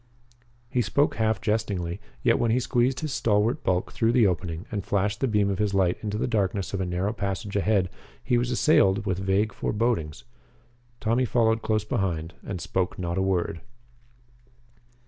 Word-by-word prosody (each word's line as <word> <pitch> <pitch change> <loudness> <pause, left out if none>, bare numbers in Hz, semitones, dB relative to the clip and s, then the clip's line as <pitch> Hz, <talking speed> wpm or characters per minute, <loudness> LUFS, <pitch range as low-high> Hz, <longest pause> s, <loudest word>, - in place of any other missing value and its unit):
He 125 +1 0
spoke 140 +4 +1
half 110 -1 +1
jestingly, 100 -5 -2 0.2
yet 115 -3 +3
when 120 - +2
he 120 +3 +3
squeezed 125 +2 +1
his 155 -3 -3
stalwart 105 0 +1
bulk 90 -1 0
through 115 +1 +1
the 120 -3 +5
opening 90 -1 -1
and 100 -3 -2
flashed 100 +3 0
the 135 - +1
beam 105 -3 +2
of 95 - -3
his 105 -2 0
light 90 -2 +2
into 105 -1 -3
the - - 0
darkness 100 -4 -1
of 95 - -1
a 90 - -1
narrow 90 +4 -1
passage 100 -1 -4
ahead 100 -2 +2 0.4
he 125 - +1
was 120 0 +1
assailed 100 -7 +3
with 95 -2 -1
vague 95 +2 +1
forebodings. 105 -9 -1 0.8
Tommy 115 +3 +1
followed 115 -2 +2
close 110 -1 0
behind 85 -5 -2
and 95 -4 -5
spoke 90 +2 -2
not 85 0 -2
a - - +2
word. 90 -3 0
105 Hz, 175 wpm, -26 LUFS, 95-115 Hz, 0.8 s, the